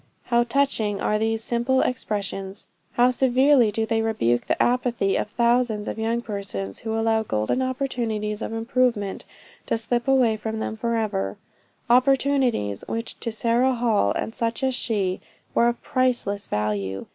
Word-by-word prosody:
How 235 Hz, -1 st, +2 dB
touching 235 Hz, -5 st, 0 dB
are 210 Hz, -, +1 dB
these 225 Hz, 0 st, 0 dB
simple 240 Hz, +3 st, +1 dB
expressions! 200 Hz, -4 st, -3 dB, 0.3 s
How 245 Hz, +1 st, +4 dB
severely 260 Hz, -1 st, +4 dB
do 220 Hz, +1 st, -1 dB
they 225 Hz, 0 st, 0 dB
rebuke 120 Hz, -, 0 dB
the -, -, 0 dB
apathy 240 Hz, -5 st, +1 dB
of -, -, -1 dB
thousands 235 Hz, -2 st, +1 dB
of -, -, -4 dB
young 230 Hz, +2 st, -1 dB
persons, 195 Hz, -, -5 dB
who 220 Hz, 0 st, -3 dB
allow 225 Hz, 0 st, +2 dB
golden 110 Hz, -, -1 dB
opportunities 235 Hz, -5 st, -2 dB
of -, -, -4 dB
improvement 225 Hz, -3 st, 0 dB, 0.4 s
to -, -, +1 dB
slip 235 Hz, +2 st, -2 dB
away 250 Hz, -5 st, +3 dB
from 220 Hz, +1 st, -4 dB
then 220 Hz, -, -3 dB
forever 220 Hz, -, -1 dB, 0.5 s
opportunities 255 Hz, -, +2 dB
which 230 Hz, +1 st, -4 dB
to 230 Hz, -, -3 dB
Sarah 235 Hz, +4 st, +2 dB
Hall 225 Hz, -, +2 dB
and 225 Hz, -, -3 dB
such 230 Hz, +3 st, -2 dB
as 265 Hz, 0 st, +2 dB
she, 200 Hz, -7 st, -1 dB, 0.3 s
were 235 Hz, -, +4 dB
of 240 Hz, 0 st, -2 dB
priceless 240 Hz, -6 st, 0 dB
value! 100 Hz, -2 st, -2 dB
225 Hz, 150 wpm, -24 LUFS, 210-245 Hz, 0.5 s, How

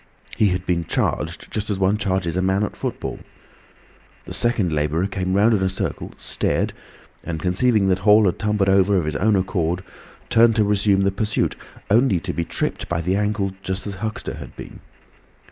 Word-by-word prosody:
He 105 Hz, -, +3 dB
had 90 Hz, -1 st, -1 dB
been 85 Hz, -2 st, 0 dB
charged 80 Hz, +2 st, -2 dB
just 110 Hz, 0 st, -3 dB
as 100 Hz, -, 0 dB
one 95 Hz, +2 st, +1 dB
charges 95 Hz, -5 st, -1 dB
a 95 Hz, -, +1 dB
man 95 Hz, +2 st, +1 dB
at 105 Hz, -, -3 dB
football. -, -, -4 dB, 1.1 s
The -, -, -7 dB
second 105 Hz, -8 st, +1 dB
labourer 75 Hz, +4 st, 0 dB
came 95 Hz, -1 st, -2 dB
round 105 Hz, +4 st, +4 dB
in 100 Hz, -, +1 dB
a 95 Hz, -, +2 dB
circle, 95 Hz, -, -4 dB
stared, -, -, -1 dB, 0.5 s
and 80 Hz, -2 st, -4 dB
conceiving 95 Hz, +4 st, +2 dB
that 95 Hz, 0 st, +2 dB
Hall 105 Hz, +2 st, +5 dB
had 90 Hz, -, 0 dB
tumbled 105 Hz, -2 st, +1 dB
over 95 Hz, +1 st, +4 dB
of 85 Hz, -, 0 dB
his 75 Hz, -1 st, -2 dB
own 105 Hz, +7 st, +2 dB
accord, 90 Hz, -2 st, -1 dB, 0.4 s
turned 115 Hz, 0 st, +5 dB
to 110 Hz, -, +4 dB
resume 100 Hz, -1 st, +2 dB
the 100 Hz, 0 st, +2 dB
pursuit, 105 Hz, +2 st, -1 dB, 0.4 s
only 110 Hz, -4 st, +4 dB
to 90 Hz, -3 st, -4 dB
be 85 Hz, -, -1 dB
tripped -, -, -3 dB
by 85 Hz, -, 0 dB
the 90 Hz, +3 st, 0 dB
ankle 105 Hz, -1 st, 0 dB
just 95 Hz, 0 st, -3 dB
as 100 Hz, -2 st, -5 dB
Huxter 110 Hz, +2 st, -4 dB
had -, -, -10 dB
been. -, -, -10 dB
95 Hz, 190 wpm, -22 LUFS, 90-105 Hz, 1.1 s, Hall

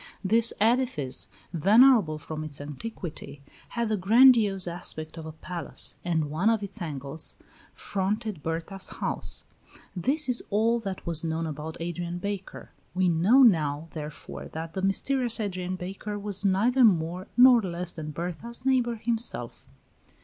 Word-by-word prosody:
This 225 Hz, +4 st, +5 dB
edifice, 225 Hz, -, +1 dB, 0.3 s
venerable 205 Hz, -, +5 dB
from 155 Hz, 0 st, -6 dB
its 150 Hz, -2 st, -6 dB
antiquity, 150 Hz, -1 st, -7 dB, 0.3 s
had 235 Hz, -1 st, +1 dB
the 215 Hz, -1 st, 0 dB
grandiose 215 Hz, -1 st, +5 dB
aspect 165 Hz, -2 st, -5 dB
of 160 Hz, -1 st, -8 dB
a -, -, -6 dB
palace, 170 Hz, +2 st, -3 dB
and 160 Hz, -4 st, -1 dB
one 175 Hz, +8 st, +2 dB
of 225 Hz, -2 st, +1 dB
its 200 Hz, +1 st, -7 dB
angles 145 Hz, -1 st, -6 dB, 0.4 s
fronted 205 Hz, -1 st, -3 dB
Berta's 165 Hz, +5 st, -3 dB
house. -, -, -4 dB, 0.5 s
This 275 Hz, -, +1 dB
is 250 Hz, -2 st, +1 dB
all 225 Hz, +3 st, +2 dB
that 195 Hz, -4 st, -6 dB
was 165 Hz, -2 st, 0 dB
known 165 Hz, 0 st, -2 dB
about 155 Hz, +1 st, -6 dB
Adrian 175 Hz, +1 st, -4 dB
Baker. 200 Hz, +1 st, -6 dB, 0.2 s
We 185 Hz, -1 st, +3 dB
now 190 Hz, +11 st, +5 dB
know, 160 Hz, -, +3 dB
therefore, 150 Hz, -1 st, -7 dB
that 160 Hz, +1 st, -6 dB
the 190 Hz, -, -3 dB
mysterious 240 Hz, +5 st, +1 dB
Adrian 185 Hz, -3 st, -3 dB
Baker 195 Hz, +3 st, -6 dB
was 205 Hz, -1 st, -2 dB
neither 220 Hz, +7 st, +3 dB
more 180 Hz, -2 st, +2 dB
nor 250 Hz, -1 st, +8 dB
less 180 Hz, -2 st, -3 dB
than 155 Hz, -2 st, -6 dB
Berta's 180 Hz, -, -6 dB
neighbor 250 Hz, -3 st, +2 dB
himself. 230 Hz, +1 st, -3 dB
185 Hz, 140 wpm, -27 LUFS, 160-225 Hz, 0.5 s, nor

